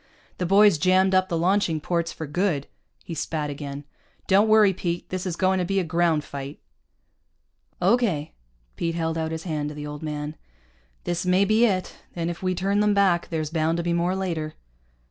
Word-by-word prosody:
The 180 - -1
boys 200 -3 +5
jammed 185 +2 +3
up 185 0 +3
the 170 - 0
launching 175 -2 +1
ports 170 +1 -1
for 160 - -6
good." 155 -1 -1 0.4
He 170 - -7
spat 155 -2 -3
again. 140 0 -6 0.4
"Don't 200 +3 +4
worry, 215 -2 +5
Pete. 175 -1 -3
This 185 0 -3
is 175 - -2
going 185 +1 +2
to - - +1
be 195 +2 0
a - - 0
ground 165 -2 +1
fight." 140 +1 -7 1.2
"Okay." 195 -12 +1 0.4
Pete 165 -1 -1
held 165 -1 -1
out 160 -1 -2
his 160 0 -5
hand 150 -4 -2
to 150 - -8
the 150 0 -6
old 150 0 -7
man. 150 -1 -4 0.7
"This 175 0 -2
may 185 +2 +3
be 215 +3 +4
it. 185 -3 -2 0.2
And 170 0 -2
if 170 - -9
we 185 -1 0
turn 195 +3 0
them 210 0 +3
back, 190 -4 +2
there's 155 -2 -3
bound 165 0 +1
to 170 - -2
be 170 0 0
more 175 +2 +1
later." 165 -5 -3
170 Hz, 195 wpm, -24 LUFS, 155-190 Hz, 1.2 s, boys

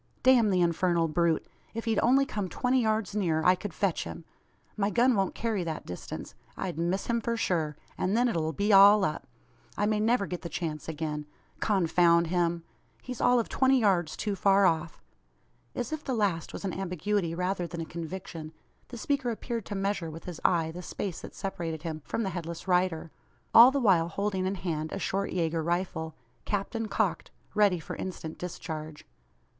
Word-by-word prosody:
"Damn 250 -4 +6
the 185 -2 +2
infernal 170 0 +2
brute! 165 0 +1 0.3
If 230 - -4
he'd 225 -2 +1
only 270 +4 +4
come 205 -7 -3
twenty 255 +5 +1
yards 215 -3 0
nearer, 165 -6 +1
I 180 - +7
could 190 +2 -5
fetch 185 +1 0
him. 165 - -8 0.5
My 205 -1 +1
gun 245 +4 +4
won't 195 -2 0
carry 220 -5 -1
that 160 -2 -4
distance. 90 - -7 0.2
I'd 175 -4 -4
miss 175 +3 0
him 235 -1 0
for 230 +1 -1
sure, 160 -8 0 0.2
and 195 +4 +1
then 245 +1 +4
it'll 160 -8 0
be 200 +7 +1
all 200 +1 +8
up. 155 - -3 0.5
I 205 - +1
may 215 0 +1
never 220 -1 +2
get 180 -2 -5
the 170 - -6
chance 155 -1 -4
again. 150 -1 -4 0.3
Confound 170 -4 +3
him! 170 -1 +1 0.4
He's 250 -1 -6
all 245 0 +5
of 230 - -1
twenty 265 0 +3
yards 185 -7 +1
too 205 -2 -2
far 195 0 +4
off." 165 -1 0 0.7
As 245 +4 -3
if 310 -1 -4
the 260 - -2
last 195 -7 0
was - - -6
an 190 - -2
ambiguity 180 -1 -1
rather 180 0 -1
than 170 0 -7
a 165 - -3
conviction, 165 -1 -7 0.3
the 245 - -8
speaker 280 -1 -1
appeared 230 -1 -4
to 205 - -4
measure 195 -4 -1
with 160 +1 -9
his 175 -3 -7
eye 165 -3 +2
the 175 +2 -7
space 180 -1 -5
that - - -10
separated 165 -5 -4
him 160 -2 -4
from 230 - -2
the 195 - -2
headless 170 0 -6
rider 180 -3 +1 0.4
all 235 +2 +10
the 280 +1 0
while 185 -9 +4
holding 190 +1 -1
in 195 - -1
hand 160 -4 -3
a - - -3
short 195 +1 -2
Yager 165 -2 0
rifle, 170 -1 -2 0.3
capped 205 +1 -2
and 225 -2 -3
cocked - - 0 0.2
ready 205 -3 +4
for - - -7
instant 170 -4 -6
discharge. 155 -3 -6
185 Hz, 190 wpm, -29 LUFS, 165-210 Hz, 0.7 s, all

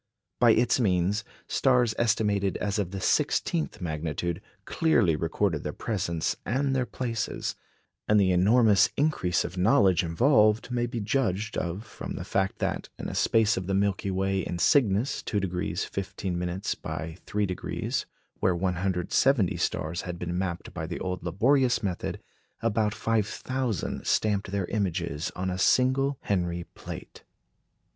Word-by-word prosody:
By 120 -2 +6
its 120 +3 +3
means 100 -1 +1 0.2
stars 125 -4 +3
estimated 105 -4 +1
as 105 +1 -1
of 100 -4 -1
the 95 +1 -5
sixteenth 80 -4 0
magnitude 80 +2 -3 0.2
clearly 115 - +2
recorded 80 +2 0
their - - -4
presence 85 -7 -2
and 135 +4 0
their 125 -2 0
places; 115 -3 -3 0.5
and 105 0 +5
the 95 -2 +3
enormous 105 +2 +5
increase 140 - +1
of 90 - -5
knowledge 95 -2 +4
involved 110 - +3
may 120 -1 0
be 120 -2 -4
judged 110 -2 -1
of 90 +6 -3
from - - -7
the - - -5
fact 95 -1 -1
that, - - -2
in - - -5
a - - -6
space 110 -2 +3
of 95 -1 -3
the 95 - 0
Milky 100 0 0
Way 95 +1 0
in 90 -1 -3
Cygnus 110 - +2
2° 90 -2 -2
15' 95 -2 -4 0.4
by 80 0 -5
3°, 100 -3 -2 0.3
where 95 - +2
170 95 +5 +1
stars 85 +3 -2
had 90 -1 -5
been 85 0 -4
mapped 90 -1 -3
by 80 -2 -4
the 85 - -5
old 90 -1 -3
laborious 125 - +2
method, 90 -3 -3 0.4
about 110 -2 +1
five 110 -2 +1
thousand 130 - -3
stamped 105 -2 +1
their 100 -2 -1
images 90 -7 -2
on 95 0 -2
a 90 - -4
single 130 +5 +3
Henry 90 -3 -1
plate. - - -9
100 Hz, 145 wpm, -27 LUFS, 90-115 Hz, 0.5 s, By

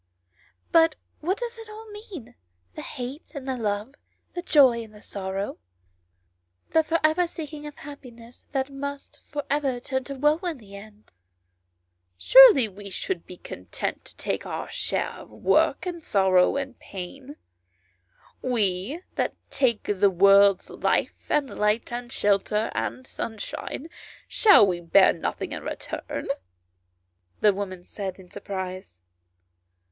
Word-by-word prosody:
But 325 -1 +5 0.2
what 365 +6 -1
does 475 -1 -5
it 450 -1 -10
all 435 +1 -10
mean 375 - -10 0.4
the - - -7
hate 260 +7 -7
and 270 -2 -6
the 260 - -1
love, 210 +1 -2 0.4
the 350 - -3
joy 270 -8 +5
and 215 -1 -14
sorrow, 195 0 -4 1.1
the 320 - +5
for 325 +1 0
ever 320 +3 +3
seeking 300 -2 -7
for - - -20
happiness 245 -5 -12
that 270 0 -1
must 280 +1 -6
for 290 0 -3
ever 275 -3 0
turn 260 +1 -2
to 280 - -6
woe 295 +4 +3
in 345 -5 -3
the 200 -4 -13
end 210 - -14 0.4
?" 90 0 -50
" 90 0 -49
Surely - - +8
we 200 0 -9
should 180 -2 -4
be 180 - -10
content - - -5
to - - -11
take - - -2
our - - -5
share - - -1
of - - -12
work, - - +2
and 345 -3 -5
sorrow, 190 -3 +3
and 270 -2 -4
pain; 260 +10 -8 1.1
we 230 - 0
that - - 0 0.2
take 235 -5 +1
the 200 0 +3
world's 200 +1 +5
life, - - -1
and 290 -3 0
light, 210 +3 +1
and 240 0 -5
shelter, 210 0 +1
and 255 - -3
sunshine, 230 +6 -5 0.4
shall 410 - +7
we 180 -3 -1
bear 185 +3 +5
nothing 165 - -4
in - - -4
return - - -5 0.6
?" 90 0 -46
the 210 -1 +5
woman 185 -2 -5
said 195 -3 -5
in 185 -2 -16
surprise. 185 - -6
235 Hz, 145 wpm, -26 LUFS, 195-290 Hz, 1.1 s, Surely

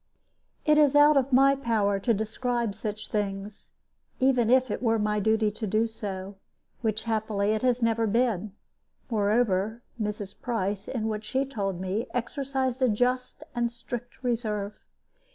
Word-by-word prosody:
It 300 0 +5
is 290 -2 +4
out 295 +1 +7
of 275 0 +2
my 275 +2 +6
power 215 -6 +1
to 230 +5 +1
describe 230 +1 -1
such 210 +1 -5
things, 200 -1 -3 0.5
even 255 -3 +3
if 255 -2 +4
it - - -3
were 225 -2 +2
my 210 0 0
duty 220 +1 +2
to 215 +1 -5
do 215 +3 +2
so, 200 -3 -6 0.4
which, 220 -2 -1
happily, 215 -2 0
it 215 - 0
has 250 -1 +1
never 230 0 +2
been; 215 -3 +1 0.6
moreover, 215 0 +1 0.2
Mrs. 210 -2 -4
Price, 205 -4 -2
in 225 -4 -2
what 215 -1 -3
she 260 +6 0
told 200 -9 -3
me, 190 +5 -2
exercised 265 +1 -2
a 255 - +4
just 250 +3 0
and 240 -1 0
strict 245 +1 -7
reserve. 215 -4 -2
225 Hz, 150 wpm, -27 LUFS, 210-250 Hz, 0.6 s, out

